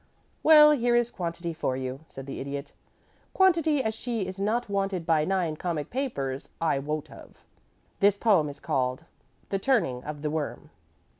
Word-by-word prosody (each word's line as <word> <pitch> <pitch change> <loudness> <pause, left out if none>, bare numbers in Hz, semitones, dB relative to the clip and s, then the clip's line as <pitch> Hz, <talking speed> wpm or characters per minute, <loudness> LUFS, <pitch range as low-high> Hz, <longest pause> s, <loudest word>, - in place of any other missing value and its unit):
"Well, 300 -1 +8
here 245 -4 +2
is 240 0 +2
quantity 170 -1 -4
for 130 -5 -2
you," 130 0 -4
said 135 - -9
the 135 - -6
Idiot. 140 +1 -5 0.6
"Quantity 330 -7 +3
as 220 - -1
she 225 -2 -3
is 185 +1 -7
not 225 +4 0
wanted 195 -3 -1
by 160 -2 +3
nine 180 -4 0
comic 160 -3 -3
papers 140 - -3
I 160 -4 +1
wot 150 +2 -4
of. - - -14 0.6
This 200 0 +4
poem 195 -9 +3
is 145 0 -10
called: 130 +4 -1 0.4
"THE 195 - -1
TURNING 180 - +1
OF 150 0 -7
THE 150 - -1
WORM. 155 -2 -4
170 Hz, 165 wpm, -27 LUFS, 145-230 Hz, 0.6 s, Well